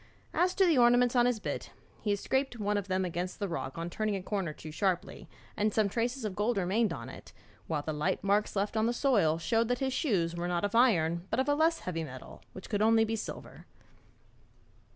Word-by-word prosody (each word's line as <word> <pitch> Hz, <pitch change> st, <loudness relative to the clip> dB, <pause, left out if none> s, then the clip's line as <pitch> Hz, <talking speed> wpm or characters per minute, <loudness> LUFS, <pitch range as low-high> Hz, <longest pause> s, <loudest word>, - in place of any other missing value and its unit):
As 360 Hz, +1 st, +2 dB
to 385 Hz, -, +4 dB
the 325 Hz, -7 st, +4 dB
ornaments 245 Hz, +1 st, +4 dB
on 240 Hz, 0 st, +5 dB
his 245 Hz, -3 st, 0 dB
bit, -, -, -4 dB, 0.3 s
he 210 Hz, -, -3 dB
had 205 Hz, -, +2 dB
scraped 265 Hz, +3 st, -1 dB
one 210 Hz, -1 st, -1 dB
of 200 Hz, -1 st, -2 dB
them 185 Hz, 0 st, 0 dB
against 180 Hz, +1 st, -4 dB
a 200 Hz, -, -1 dB
rock 135 Hz, -6 st, -5 dB
on 165 Hz, +1 st, -3 dB
turning 215 Hz, +3 st, -2 dB
a 190 Hz, -, -4 dB
corner 195 Hz, -5 st, -2 dB
too 155 Hz, +1 st, -10 dB
sharply, 185 Hz, +2 st, -2 dB, 0.3 s
and 210 Hz, +1 st, +1 dB
some 210 Hz, -1 st, +2 dB
traces 240 Hz, +3 st, -2 dB
of 200 Hz, -3 st, -3 dB
gold 215 Hz, +2 st, 0 dB
remained 195 Hz, +3 st, +1 dB
on 115 Hz, -8 st, -6 dB
it, -, -, -11 dB, 0.3 s
while 150 Hz, -3 st, -2 dB
the 155 Hz, -, -3 dB
light 165 Hz, +7 st, -1 dB
marks 205 Hz, +2 st, +1 dB
left 205 Hz, +2 st, -1 dB
on 220 Hz, +1 st, +2 dB
the 240 Hz, -, +1 dB
soil 210 Hz, -, +2 dB
showed 225 Hz, +7 st, +1 dB
that 245 Hz, +1 st, 0 dB
his 265 Hz, 0 st, -1 dB
shoes 180 Hz, -, 0 dB
were 175 Hz, +1 st, -3 dB
not 175 Hz, +2 st, 0 dB
of 205 Hz, -, -3 dB
iron 175 Hz, -8 st, +3 dB
but 225 Hz, -, 0 dB
of 265 Hz, -, +1 dB
a 290 Hz, -, +3 dB
less 320 Hz, +2 st, +2 dB
heavy 165 Hz, -3 st, -3 dB
metal, 130 Hz, -4 st, -10 dB
which 190 Hz, -, -9 dB
could 205 Hz, -1 st, -1 dB
only 225 Hz, +1 st, +5 dB
be 225 Hz, +1 st, -2 dB
silver.' 215 Hz, -, -8 dB
205 Hz, 230 wpm, -30 LUFS, 175-240 Hz, 0.3 s, on